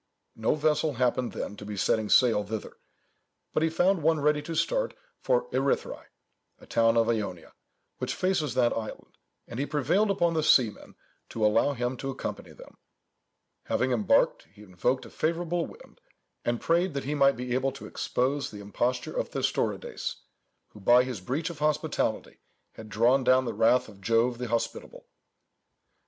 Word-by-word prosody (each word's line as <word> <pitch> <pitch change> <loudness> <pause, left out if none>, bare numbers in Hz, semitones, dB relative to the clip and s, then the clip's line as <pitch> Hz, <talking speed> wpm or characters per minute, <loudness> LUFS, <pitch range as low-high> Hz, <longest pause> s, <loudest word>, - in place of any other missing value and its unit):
No 110 +5 +1
vessel 150 0 +1
happened 125 0 0
then 105 - -5
to - - -9
be 105 0 -6
setting 105 +2 +1
sail 115 -5 +4
thither, 105 +1 -6 0.8
but - - +1
he 160 - +2
found 175 +2 +2
one 160 +1 +2
ready 150 +1 +2
to 165 +2 -6
start - - 0 0.2
for - - +1
Erythræ, 485 +1 -1 0.5
a - - -15
town 115 0 +2
of 115 -1 +3
Ionia, 100 -7 -3 0.5
which - - -2
faces 175 -8 0
that 120 -2 +3
island, 110 -1 -7 0.3
and 115 - -7
he 145 - -1
prevailed 155 +9 +1
upon 175 -4 +2
the 160 - +1
seamen 125 -7 +2 0.3
to 110 -2 -1
allow 115 +7 +3
him 125 0 -2
to 135 - -4
accompany 135 - -6
them. - - -15 0.9
Having 130 +1 0
embarked, 110 -6 +2
he 105 +1 -15
invoked 105 +7 -1
a - - -11
favourable 170 +1 -1
wind, - - -16 0.4
and 120 0 -1
prayed 170 -1 +1
that 140 - -2
he 145 - -2
might 140 -1 +4
be 125 0 -3
able 130 +1 +1
to - - -10
expose 140 +3 -1
the 105 - -10
imposture 120 +5 -2
of - - -2
Thestorides, - - -2 0.5
who, 105 - -15
by 120 +5 +5
his 125 -7 -5
breach 145 - -2
of 160 - -11
hospitality, 150 -1 -1 0.3
had 110 -1 -11
drawn 120 +5 +3
down 130 +1 +4
the 115 - -3
wrath 125 +3 +3
of 100 -3 -15
Jove 115 +4 +1
the 125 - -3
Hospitable. 115 0 -3
130 Hz, 170 wpm, -28 LUFS, 115-155 Hz, 0.9 s, by